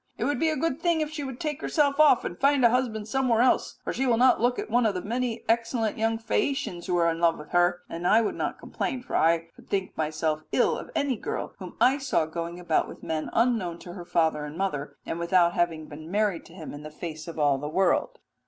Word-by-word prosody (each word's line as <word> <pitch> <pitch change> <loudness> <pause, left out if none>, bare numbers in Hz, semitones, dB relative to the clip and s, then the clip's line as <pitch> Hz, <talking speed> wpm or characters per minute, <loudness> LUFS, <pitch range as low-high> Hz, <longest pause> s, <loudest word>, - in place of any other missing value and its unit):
It - - -2
would 285 +4 0
be 320 +1 +2
a 310 - 0
good 325 -1 -1
thing 340 -2 +2
if 305 0 -2
she 305 -2 -4
would 265 -3 -6
take 300 -3 -3
herself 285 -2 +1
off 300 -5 +6
and - - -4
find 275 +2 +3
a 235 - +6
husband 230 -4 -1
somewhere 245 -1 +2
else, 250 - +2
for - - -3
she 265 - 0
will 235 -2 +3
not 250 0 +4
look 245 +1 +2
at - - -3
one 235 +1 +3
of 205 - -1
the 180 - -2
many 235 +1 -2
excellent 230 -1 +1
young 225 0 0
Phaeacians 225 -5 -2
who 180 -1 +1
are 170 -1 +3
in 165 - -4
love 170 -1 +3
with 150 - -11
her'; 175 0 +2
and 170 +1 -3
I 220 - +6
could - - -1
not - - -3
complain, 255 -2 -4
for - - -5
I 165 0 +2 0.2
should 195 -2 -2
myself 155 0 -1
think 155 - -28
ill - - +3
of - - -7
any 275 -4 0
girl - - -4
whom 185 -2 -9
I 255 +5 +4
saw 270 - +1
going 170 +2 -5
about 170 -3 +1
with - - -11
men 155 -1 -3
unknown 225 -8 +1
to 175 - -9
her 180 -2 -8
father 160 -3 +1
and 150 +2 -7
mother, 160 -7 -3
and 165 - -4
without 170 0 +3
having 165 -3 0
been 155 +2 -10
married 205 -2 0
to 165 - -15
him 165 -4 -8
in 145 - -8
the 155 - -8
face 155 +1 -7
of 165 - -7
all 145 -3 +2
the 145 +2 -4
world.'" 195 - +1
195 Hz, 255 wpm, -27 LUFS, 165-250 Hz, 0.2 s, off